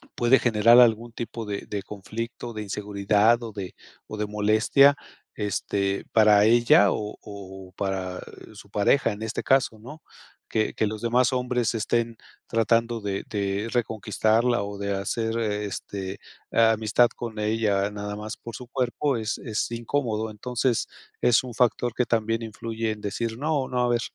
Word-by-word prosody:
puede 120 +2 +4
generar 115 +1 +5
algún 115 -1 +4
tipo 115 -1 -5
de 100 -1 -5
de 100 -2 -4
conflicto, 115 +4 -6
de 110 - -5
inseguridad 105 +3 +1
o 115 - -6
de 100 -3 -7 0.3
o - - -7
de 105 - -1
molestia, 110 +7 +4 0.4
este, 100 -1 -2
para 105 -2 +6
ella 115 -3 +5
o 105 0 -4
o 95 -2 -10
para 95 -2 -3 0.3
su 100 -1 -13
pareja, 105 +7 +2
en 105 - -10
este 110 0 -3
caso, 130 -4 +2
¿no? 125 +8 -11 0.5
Que 110 -1 0
que 110 - 0
los 110 0 -5
demás 120 +2 +2
hombres 125 -2 0
estén 115 +1 0 0.3
tratando 115 +1 +1
de 100 -1 -3
de 100 0 -2
reconquistarla 115 0 +1
o 100 0 -6
de 100 0 -2
hacer, 115 +4 -2
este, 100 -2 -4 0.3
amistad 115 +1 +4
con 115 -2 -6
ella, 105 -2 +1
nada 105 0 -5
más 105 +1 -6
por 115 - -9
su 125 - -9
cuerpo 130 +1 0
es 110 -1 -2
es 110 -4 -2
incómodo, 115 -2 -2
entonces 120 +2 -1 0.3
es 120 0 +4
un 125 -2 -7
factor 120 0 +1
que 125 - 0
también 115 0 0
influye 115 0 -4
en 105 -1 -7
decir 110 +3 -3
no 145 -1 0
no 125 -1 0
a 120 - +1
ver, 120 -1 +1
110 Hz, 160 wpm, -25 LUFS, 105-120 Hz, 0.5 s, para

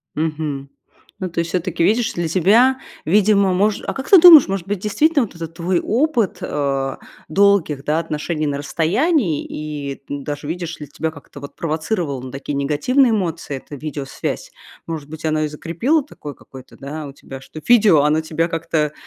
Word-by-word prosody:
Мгм. 150 -3 -3 0.5
Ну 185 - -2
то 170 -1 -2
есть 170 0 -3
всё-таки 180 -2 -1
видишь, 225 +6 +2
для 170 -1 -2
тебя 220 +10 +4 0.3
видимо 200 +2 +3
мож 200 +3 +1
А - - -1
как 270 +1 -6
ты 385 - +8
думаешь, 320 -5 +10
может 195 -2 -3
быть 205 - -1
действительно 285 - +2
вот 200 - -10
этот 165 -1 -7
твой 175 +1 0
опыт, 245 - 0
э, 135 -2 -2 0.3
долгих, 180 -6 +2
да, 150 +3 +1
отношений 155 0 -2
на 140 -1 -2
расстоянии, 170 - 0
и 145 -2 -6
даже 145 +1 -5
видишь 170 +1 -4
ли, 150 - -8
тебя 150 +3 -3
как-то 145 -2 -13
вот 140 - -10
провоцировало 160 - -2
на 130 - -7
такие 140 +2 -5
негативные 235 - +2
эмоции, 170 -9 -2
эта 145 - -10
видеосвязь. 145 -1 -5 0.3
Может 155 -3 -6
быть, 160 +1 -10
оно 155 -1 +1
и 155 - 0
закрепило 170 - 0
такое, 145 -1 -10
какое-то, 130 -1 -14
да, 145 +2 -7
у 140 - -10
тебя, 135 -1 -11
что 155 +3 -11
видео, 215 -11 +6
оно 150 +2 +2
тебя 160 +1 -1
как-то 165 -3 -1
160 Hz, 175 wpm, -20 LUFS, 145-200 Hz, 0.5 s, думаешь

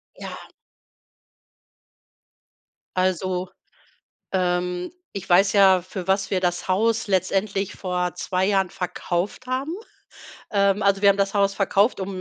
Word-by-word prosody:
Ja. - - -9 2.5
Also, 185 0 0 0.8
ähm, 180 - -1 0.2
ich 195 -1 -6
weiß 195 +4 +4
ja, 190 -2 +6
für 185 +1 -7
was 195 0 +1
wir 185 -2 +1
das 175 0 -1
Haus 225 +4 +1
letztendlich 195 +1 0
vor 180 -1 -2
2 185 +1 -1
Jahren 195 -2 +2
verkauft 180 +6 -3
haben. 265 +5 -2 0.8
Ähm, 200 0 +3
also, 200 0 +2
wir 200 - +6
haben 195 - +5
das 200 0 0
Haus 200 -1 +2
verkauft, 200 +3 +2
um 190 -1 -4
190 Hz, 125 wpm, -23 LUFS, 180-200 Hz, 2.5 s, ja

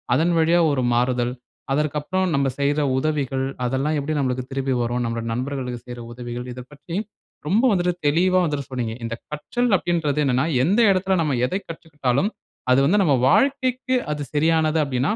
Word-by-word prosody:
அதன் 165 +5 +2
வழியா 165 +2 +4
ஒரு 130 -2 0
மாறுதல் 125 0 +1 0.4
அதற்க்கப்புறம் 150 +5 0
நம்ம 140 0 +2
செய்த 145 +2 +1 0.2
உதவிகள், 135 -2 -1 0.2
அதெல்லாம் 135 +5 0
எப்படி 155 +2 -2
நம்மளுக்கு 130 -2 -1
திருப்பி 135 -1 -1
வரும் 120 +1 -1
நம்முடைய 115 0 -3
நண்பர்களுக்கு 125 -1 -3
செய்ற 120 0 -7
உதவிகள் 120 0 -6
இத 125 - -8
பற்றி 165 +4 -8 0.5
ரொம்ப 215 +8 +2
வந்துட்டு 180 -2 +1
தெளிவா 185 +5 +3
வந்துட்டு 145 -4 -2
சொன்னீங்க. 120 -3 -2
இந்த 115 - -3 0.2
கற்றல் 240 +11 -1
அப்படின்றது 165 -5 -1
என்னன்னா 130 +2 +2 0.2
எந்த 195 - +2
இடத்தில 190 0 +1
நம்ம 150 -4 0
எத - - -7
கற்றுக்கிட்டாலும் 150 - -2 0.4
அது 130 - +5
வந்து 200 +7 +3
நம்ம 145 -6 +3
வாழ்க்கைக்கு 260 - +2 0.2
அது 145 -1 -4
சரியானது 160 +1 +2
அப்படினா 130 +5 0
145 Hz, 160 wpm, -22 LUFS, 130-170 Hz, 0.5 s, அது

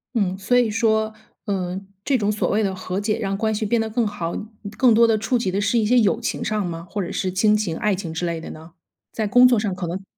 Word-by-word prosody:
嗯， 190 -4 +1
所 245 +6 +2
以 240 -3 +3
说 220 +1 +1 0.3
嗯， 190 -2 -3 0.2
这 275 +3 +2
种 210 -2 0
所 210 - -1
谓 215 +1 +1
的 195 -2 0
和 185 +1 -4
解 210 +1 -1
让 195 -2 -2
关 220 0 0
系 215 - -2
变 230 +3 +1
得 225 - -1
更 225 0 0
好， 175 -5 -4 0.4
更 255 -2 +5
多 230 +2 +6
地 225 - +3
触 230 +4 0
及 195 -5 -1
的 200 +2 -1
是 205 +4 +1
一 220 - +2
些 245 +3 +4
友 220 +1 +2
情 240 - -3
上 215 -2 -1
吗？ 170 0 -6
或 205 - -3
者 175 - -5
是 185 - -2
亲 210 +3 +3
情、 195 -7 -1
爱 210 - +1
情 180 -3 -4
之 160 +2 -3
类 170 -1 -3
的 - - -8
呢？ 160 +2 -11 0.4
在 220 -2 -2
工 245 +5 +7
作 245 -3 +3
上 210 -3 -1
可 180 -1 -4
能 180 +3 -4
210 Hz, 290 characters per minute, -22 LUFS, 185-220 Hz, 0.4 s, 工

